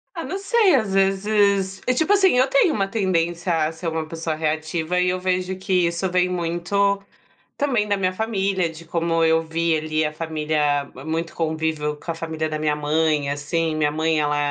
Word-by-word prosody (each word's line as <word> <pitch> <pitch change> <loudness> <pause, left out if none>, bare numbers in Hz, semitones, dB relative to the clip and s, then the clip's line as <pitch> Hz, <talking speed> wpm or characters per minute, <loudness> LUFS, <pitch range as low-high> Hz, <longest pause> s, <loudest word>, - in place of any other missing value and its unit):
Ah 335 - -4
não 385 - -4
sei, 400 - +3
às 215 -6 0
vezes, 195 0 +2
e 255 - +3
tipo, 330 +8 +2
assim, 380 -10 +4
eu 260 +2 +4
tenho 280 +5 +3
uma 195 -2 0
tendência, 175 -4 0
a 155 - -2
ser 165 +1 -7
uma 160 -1 -2
pessoa 160 -1 -3
reativa, 160 +2 -1
e 180 0 +2
eu 185 0 -1
vejo 185 0 -1
que 185 -2 +1
isso, 170 +3 -1
vem 180 0 +2
muito 180 +3 0 0.5
também, 245 -7 0
da 205 - +2
minha 185 -1 0
família, 195 -3 0
de 165 +1 -10
como 165 0 0
eu 160 0 +3
vi 165 0 0
ali, 155 0 -1
a 150 - -1
família 150 -2 -1 0.2
muito 165 +1 -3
convívio 160 -2 -1
com - - -9
a 165 - -1
família, 160 -1 -3
da 155 - -2
minha 150 -1 0
mãe, 150 -1 +1
assim, 155 +3 -1
minha 150 -1 +1
mãe 160 0 +1
ela 145 0 +1
170 Hz, 195 wpm, -22 LUFS, 160-195 Hz, 0.5 s, assim